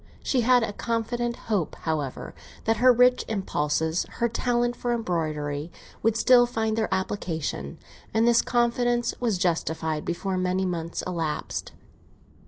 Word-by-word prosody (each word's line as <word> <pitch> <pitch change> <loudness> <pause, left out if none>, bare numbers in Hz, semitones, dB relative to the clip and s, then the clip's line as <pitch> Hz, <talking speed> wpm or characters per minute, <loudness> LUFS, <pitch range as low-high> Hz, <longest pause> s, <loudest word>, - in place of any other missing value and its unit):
She 255 - +1
had 245 0 +4
a 205 - -2
confident 235 +2 -2
hope, 205 -10 -2
however, 150 -5 -3 0.3
that 225 0 +1
her 250 +3 +6
rich 250 +1 +4
impulses, 160 -5 -1
her 235 - +1
talent 240 +1 0
for 240 0 -1
embroidery, 155 -7 -2 0.3
would 225 0 +2
still 245 0 +6
find 220 -2 -1
their 220 -1 -1
application, 160 - -3 0.3
and 225 +1 +2
this 235 -1 +5
confidence 240 0 +1
was 230 -6 0
justified 160 -3 -1
before 185 +2 -2
many 185 +1 0
months 170 -2 -3
had 185 - -4
elapsed. 160 -3 -3
210 Hz, 140 wpm, -26 LUFS, 165-240 Hz, 0.3 s, her